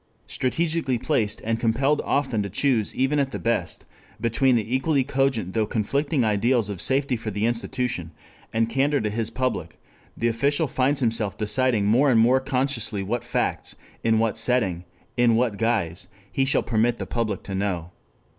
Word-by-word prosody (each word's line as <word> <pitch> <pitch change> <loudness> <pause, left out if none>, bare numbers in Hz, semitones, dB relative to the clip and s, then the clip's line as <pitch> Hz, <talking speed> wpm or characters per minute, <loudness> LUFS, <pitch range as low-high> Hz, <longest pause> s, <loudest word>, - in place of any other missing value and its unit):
Strategically 155 0 0
placed, 115 -4 -1
and 115 +1 -1
compelled 135 +6 +1
often 130 -6 0
to 100 - -3
choose 115 +1 0
even 135 +3 +1
at 140 -1 +1
the - - -4
best 115 0 -2 0.3
between 120 +3 +3
the 115 +2 0
equally 135 +1 +1
cogent 130 -8 0
though 110 -2 +1
conflicting 140 +6 0
ideals 110 +1 +1
of 100 -4 -5
safety 135 -1 +1
for 110 -1 -5
the 105 +1 -1
institution, 120 -6 -2 0.4
and 115 0 +1
candor 140 +4 +1
to 105 -1 -2
his 115 +1 -2
public, 115 -9 -3 0.4
the 115 - 0
official 140 +7 +1
finds 135 +1 0
himself 115 -4 0
deciding 110 0 +2
more 125 +7 +4
and 120 -3 +4
more 125 +4 +5
consciously 125 -6 -1
what 120 +5 -2
facts, 120 - -2 0.3
in 115 -1 +3
what 115 0 0
setting, 110 -8 +1 0.3
in 120 -2 +4
what 115 -3 +1
guise 90 -7 -1 0.2
he 135 - +1
shall 135 - +2
permit 115 +1 +1
the - - -4
public 110 -4 -2
to 100 - -6
know. 95 -3 -2
115 Hz, 170 wpm, -24 LUFS, 110-130 Hz, 0.4 s, more